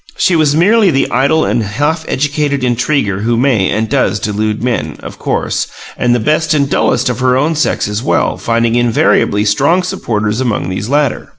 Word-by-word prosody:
She 180 - +2
was 150 -3 +2
merely 205 +5 +4
the 135 -4 0
idle 140 +5 +2
and 120 - 0
half 145 +10 -2
educated 145 -1 -1
intriguer 120 -4 0
who 115 +3 0
may 120 -7 +2
and 110 +1 -1
does 130 -4 0
delude 105 +2 -2
men, 80 -12 -2
of - - -9
course, - - -2 0.3
and 120 0 +1
the - - 0
best 155 +7 +1
and 140 -2 +1
dullest 125 -2 +1
of 125 -1 -2
her 130 0 +2
own 150 +5 +1
sex 155 -8 0
as 105 +1 -3
well, - - 0
finding 115 0 0
invariably 115 -3 +2
strong 145 - +2
supporters 110 -9 -2
among 115 -8 -1
these 95 +4 -4
latter. 145 -2 0
125 Hz, 185 wpm, -13 LUFS, 110-145 Hz, 0.3 s, merely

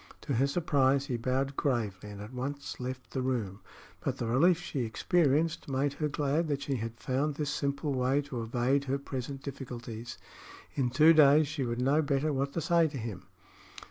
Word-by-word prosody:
To 140 - -3
her 130 +3 +3
surprise 140 -3 +2
he 130 -4 -2
bowed 130 +3 -1
gravely 110 -9 -1
and 100 0 -8
at 105 +4 -9
once 140 +3 -5
left 130 0 -6
the 130 - -2
room; 115 -7 -2 0.4
but - - -2
the - - -3
relief 160 +9 +4
she 145 - -4
experienced 150 +6 +1
made 135 +1 0
her 150 +1 -1
glad 150 +3 0
that 140 -2 -1
she 135 -2 -1
had 115 +1 -5
found 140 +3 -1
this 150 -1 -2
simple 140 +1 -1
way 130 +2 +1
to 130 -4 -5
evade 125 +5 +1
her 135 +1 0
present 135 0 -6
difficulties. 120 -4 -7 0.6
In 130 -3 0
two 155 +6 +6
days 150 0 +6
she 150 -1 -3
would 120 0 -2
know 140 +5 +3
better 145 +1 0
what 140 +1 -1
to 165 - -1
say 170 +1 +3
to 145 -2 -6
him. 105 -6 -6
135 Hz, 190 wpm, -30 LUFS, 125-145 Hz, 0.6 s, two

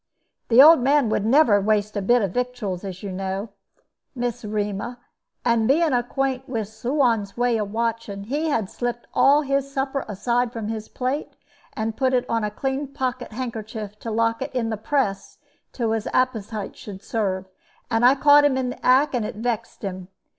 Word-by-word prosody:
"The 245 +3 +8
old 320 +1 +9
man 275 -1 +3
would 215 0 0
never 235 -6 +5
waste 210 0 0
a 205 - -1
bit 240 +4 +3
of 195 - -1
victuals, 245 -7 -3
as 190 -1 -7
you 200 - -4
know, 190 +3 -4 0.7
Miss 245 -1 -3
'Rema; 210 +2 -3 0.5
and, 230 -2 +3
being 305 +2 +3
acquaint 260 +1 -1
with 220 -5 -3
Suan's 230 -2 0
way 245 -1 +2
of 205 -1 -3
watching, 230 -3 -2
he 295 +9 -1
had 225 -9 0
slipped 240 +3 -4
all 290 +2 +5
his 275 0 -1
supper 270 0 -2
aside 240 +4 0
from 225 -3 -5
his 220 -1 -5
plate, 260 +4 -3 0.4
and 220 0 -3
put 260 -1 +2
it 250 0 +1
on 230 -1 0
a 210 - 0
clean 270 +6 -3
pocket 255 -2 -4
handkerchief 220 -3 -6
to 230 - -6
lock 230 +1 0
it 265 - -2
in 230 -2 0
the - - -1
press 215 -2 -2 0.3
till 230 -3 -1
his 220 -1 -1
appetite 220 -5 -1
should 195 -2 -10
serve; 195 -4 -2 0.5
and 225 +1 +2
I 255 +3 +7
caught 290 +1 +6
him 285 -2 +3
in 255 -1 -1
the - - -11
act, 265 +4 +4
and 245 -3 0
it 210 - -5
vexed 230 0 -3
him. 185 -2 -5
235 Hz, 185 wpm, -23 LUFS, 210-260 Hz, 0.7 s, old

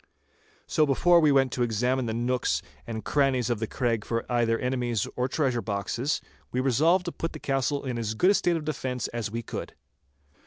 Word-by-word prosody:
So 155 -2 +2
before 170 +6 +5
we 155 -3 +4
went 135 -2 +3
to 125 - -3
examine 120 +2 +1
the 110 - -2
nooks 120 +1 0 0.2
and 110 -2 -5
crannies 130 -4 +2
of 115 - -1
the 110 - -2
Craig 115 -4 -1 0.3
either 115 -1 +2
for - - -7
enemies 125 -4 0
or 125 +1 0
treasure 130 -4 0
boxes, 115 +7 -2 0.3
we 125 - -1
resolved 155 +8 +3
to 175 - -2
put 165 - -4
the 155 - -7
castle 135 +1 0
into 125 -3 -2
as 110 -1 -2
good 180 - +4
a - - +4
state 175 -4 +2
of 155 - -6
defence 130 -4 -2
as 115 -3 -3
we 115 +2 -4
could. - - -6
125 Hz, 200 wpm, -27 LUFS, 115-145 Hz, 0.3 s, before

